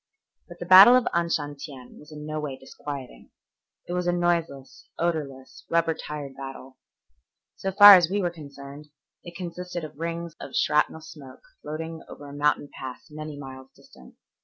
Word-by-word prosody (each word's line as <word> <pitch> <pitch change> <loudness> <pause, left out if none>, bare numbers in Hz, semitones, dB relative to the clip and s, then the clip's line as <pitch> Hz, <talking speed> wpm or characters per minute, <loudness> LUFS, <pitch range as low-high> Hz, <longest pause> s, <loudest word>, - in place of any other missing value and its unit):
But - - -12
the - - -7
battle 195 +6 +9
of 255 - +3
Anshantien 145 -6 -4
was 150 +1 -16
in 150 0 -9
no 155 0 -4
way 145 -3 -5
disquieting. 135 0 -9 0.6
It 175 - -4
was 180 0 -2
a - - +3
noiseless, 170 -6 -2
odorless, 145 -6 -4
rubber 165 -1 +2
tired 145 -3 -7
battle. 135 -1 -10 0.8
So 195 - -3
far 205 +1 +11
as 175 -3 +6
we 200 +2 -1
were 175 -3 -1
concerned 140 -2 -11 0.4
it 175 0 -11
consisted 180 -1 -6
of 155 -1 -10
rings 170 0 -5
of - - -9
shrapnel 150 +1 +1
smoke 150 -4 -13 0.2
floating 160 +1 -6
over 145 - -11
a 140 - -10
mountain 145 0 0
pass 130 +2 -9
many 155 -1 -7
miles 130 -1 -10
distant. 65 -1 -18
155 Hz, 160 wpm, -25 LUFS, 140-170 Hz, 0.8 s, far